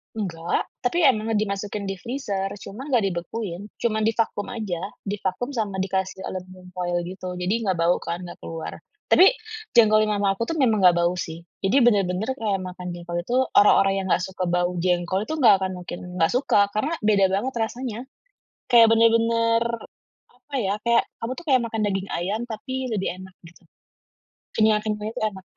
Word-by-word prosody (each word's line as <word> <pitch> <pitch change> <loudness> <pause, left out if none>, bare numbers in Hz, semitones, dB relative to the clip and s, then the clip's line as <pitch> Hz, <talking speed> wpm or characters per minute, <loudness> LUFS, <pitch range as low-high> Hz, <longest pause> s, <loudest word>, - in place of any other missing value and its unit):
Enggak. 175 -5 -2 0.2
Tapi 330 +8 0
emang 225 -5 +3
dimasukin 205 0 -2
di 195 -1 -4
freezer, 210 -6 -3 0.2
cuma 255 +9 -8
nggak 245 -7 +2
dibekuin. 180 +2 -5
Cuman 220 -2 0
di 225 - +1
vakum 220 -3 -1
aja, 215 -8 -4 0.2
di 205 0 -4
vakum 195 +9 -2
sama 215 -6 -2
dikasih 190 0 -2
aluminium 185 0 -8
foil 175 -1 -2
gitu. 180 0 -6
Jadi 180 +3 -1
nggak 185 - +2
bau 170 +1 +2
kan, 175 +2 -5
nggak 175 - -9
keluar. 165 -1 -7 0.3
Tapi, 375 - +8 0.5
jengkol 215 -2 +6
yang 210 - 0
mama 200 -1 +2
aku 230 +4 -3
tuh 330 - -1
memang 225 -7 +3
nggak 180 -2 +6
bau 175 +1 +2
sih. 165 -1 -6 0.2
Jadi 195 +8 +2
benar-benar 200 0 +2
kayak 215 -6 -1
makan 180 0 -7
jengkol 175 0 -5
itu, 240 +8 -3 0.2
orang-orang 195 -1 +5
yang - - -5
nggak 180 - +2
suka 190 -1 -4
bau 175 0 +1
jengkol 180 +1 +1
itu, - - -3
nggak 235 -7 +7
akan 190 0 -1
mungkin 175 0 -7 0.2
nggak 165 -2 +3
suka, 250 -4 +2
karena 255 +10 -1
beda 205 -2 +4
banget 210 +8 -1
rasanya. 230 0 -3 0.7
Kayak 230 -2 +7
benar-benar, 230 0 +3 0.7
apa 260 +3 -22
ya, 195 -2 0
kayak 235 0 +4 0.2
kamu 230 +2 -3
tuh 340 - -9
kayak 260 -3 +4
makan 225 -1 -3
daging 195 -1 -2
ayam 195 +6 -2
tapi 260 +4 -4
lebih 205 -3 -1
enak 190 -1 -14
gitu. 175 - -16 0.9
Kenyal-kenyalnya 215 -1 +1
itu - - -3
enak. 190 -3 -5
205 Hz, 180 wpm, -24 LUFS, 185-230 Hz, 0.9 s, Tapi